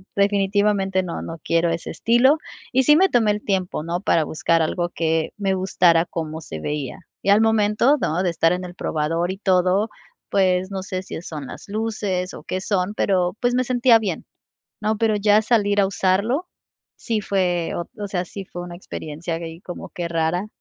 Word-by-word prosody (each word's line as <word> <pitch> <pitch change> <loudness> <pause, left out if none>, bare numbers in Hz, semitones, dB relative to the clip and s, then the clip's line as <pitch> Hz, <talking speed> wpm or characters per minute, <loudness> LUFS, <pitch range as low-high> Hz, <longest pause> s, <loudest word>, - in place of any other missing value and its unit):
definitivamente 200 -1 +2
no, 180 -2 -5
no 165 0 -7
quiero 170 0 +2
ese 165 0 -3
estilo". 240 - +4 0.4
Y 260 +1 +4
sí 295 +3 +6
me 380 +3 +5
tomé 225 -7 +3
el 210 0 -3
tiempo, 185 -5 -1
¿no?, 170 +2 -3
para 165 -5 +2
buscar 165 +1 +1
algo 175 +2 -1
que 160 -1 0
me 195 -2 0
gustara 180 -3 +3
cómo 160 -2 -5
se 80 - -7
veía. 145 - -4 0.2
Y - - 0
al 205 +2 +6
momento, 220 +5 +3
¿no?, 165 -3 0
de 185 - +1
estar 165 -1 +2
en 180 0 -3
el 175 0 -9
probador 165 +2 -1
y 190 - -6
todo, 190 +2 +2 0.4
pues, 185 -1 +2
no 190 -1 -4
sé 185 -1 -4
si 185 - -7
son 150 -5 -7
las - - -10
luces 205 -4 -2
o - - -10
qué 185 - -3
son, 190 0 -1
pero, 185 -3 +1
pues, 245 0 +1
me 255 - +2
sentía 245 -1 +4
bien, 200 -7 -3 0.6
¿no? 215 +1 0
Pero 220 0 +2
ya 210 +1 +4
salir 205 -3 +2
a - - +3
usarlo 200 - +1 0.5
sí 225 -3 -2
fue 180 -4 0
oh, 170 - -2 0.2
o 205 - -3
sea, 180 -2 -2
sí 195 +2 -8
fue 175 - -7
una 175 0 -8
experiencia 165 -1 -5
gay 165 0 -8
como 180 -2 -8
qué 175 -1 -4
rara, 165 +3 0
190 Hz, 195 wpm, -22 LUFS, 170-210 Hz, 0.6 s, sí